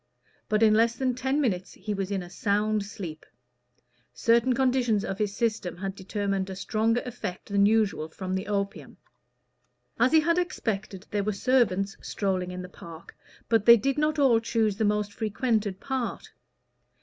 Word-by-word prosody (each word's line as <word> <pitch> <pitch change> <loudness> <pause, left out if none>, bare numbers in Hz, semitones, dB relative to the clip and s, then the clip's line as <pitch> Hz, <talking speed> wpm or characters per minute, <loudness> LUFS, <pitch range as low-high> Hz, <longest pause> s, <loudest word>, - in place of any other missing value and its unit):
But 215 +1 +2
in 215 -1 +6
less 230 +2 +3
than 255 +1 0
ten 265 +3 -1
minutes 190 -10 -1
he 210 +2 -5
was 195 -1 -3
in 195 -3 -2
a 175 - -11
sound 210 +1 0
sleep. 175 -6 -8 0.9
Certain 235 +2 +3
conditions 245 -5 +1
of 195 +1 -4
his 205 -2 -1
system 215 -7 -1
had 195 +1 -4
determined 195 0 -2
a 190 - -5
stronger 225 +5 0
effect 215 -8 -6
than 200 0 +4
usual 210 -7 +1
from 185 +3 -5
the 190 +2 -2
opium. 200 -1 -3 1.0
As 245 +2 +4
he 320 -1 +6
had 335 +3 +2
expected, 210 - -3
there 205 -1 0
were 210 +1 -1
servants 195 -4 +1
strolling 185 -3 -2
in 180 0 -6
the - - -7
park, 170 -2 -12 0.3
but 225 -2 +2
they 235 0 +10
did 275 +5 0
not 305 +1 +1
all 260 -6 +5
choose 225 -2 0
the 220 - +1
most 210 0 0
frequented 215 -3 -1
part. 260 -5 -4
210 Hz, 170 wpm, -27 LUFS, 195-235 Hz, 1.0 s, they